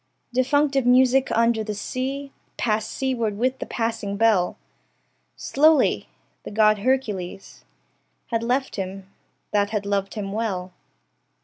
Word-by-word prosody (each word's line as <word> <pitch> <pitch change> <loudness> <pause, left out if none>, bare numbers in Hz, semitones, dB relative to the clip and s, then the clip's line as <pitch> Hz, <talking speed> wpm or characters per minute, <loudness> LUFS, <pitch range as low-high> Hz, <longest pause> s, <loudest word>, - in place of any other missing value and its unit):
Defunctive 275 +1 +2
music 260 +1 +4
under 230 -1 +2
sea 270 +6 -4 0.3
Passed 215 -1 0
seaward 235 -6 -1
with 255 +3 0
the - - -5
passing 225 -3 -2
bell 210 -5 +2 0.8
Slowly: 310 +2 +3 0.3
the - - -8
God 215 0 +3
Hercules 205 -6 -2 0.7
Had 230 -1 +1
left 255 +3 -1
him, 190 0 -5 0.4
that 205 -1 +2
had 210 -2 -2
loved 200 0 -1
him 200 -2 -4
well. 195 -4 -3
225 Hz, 115 wpm, -23 LUFS, 200-260 Hz, 0.8 s, music